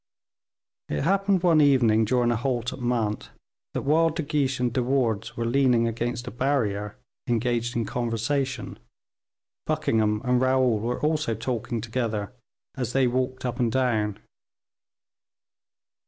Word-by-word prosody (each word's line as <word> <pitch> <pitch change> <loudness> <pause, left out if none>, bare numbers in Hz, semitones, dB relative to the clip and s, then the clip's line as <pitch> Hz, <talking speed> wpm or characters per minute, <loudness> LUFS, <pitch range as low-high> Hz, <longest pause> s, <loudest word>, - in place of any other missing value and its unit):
It 75 - -1
happened 195 -1 +2
one 165 -4 +5
evening, 120 -6 +4
during 120 +1 +2
a - - +1
halt 120 +1 -2
at - - -9
Mantes, 120 -4 -1 0.5
that - - -1
while 160 +4 +3
De 160 +1 -3
Guiche 140 -3 0
and 125 -2 0
De 130 - +1
Wardes 120 -4 -1
were 115 - -1
leaning 120 -1 +3
against 120 +1 -3
a 125 - -6
barrier, 110 -6 -1 0.3
engaged 120 0 0
in 115 -1 0
conversation, 125 +4 -2 0.9
Buckingham 105 -1 +1
and 125 0 +2
Raoul 130 -3 +3
were 120 +3 -2
also 150 -6 0
talking 115 0 -3
together 110 -2 -3 0.4
as 125 -3 -3
they 135 -1 +3
walked 130 +1 -1
up 125 +1 -3
and 120 -2 +1
down. 110 -5 0
125 Hz, 140 wpm, -25 LUFS, 115-130 Hz, 0.9 s, one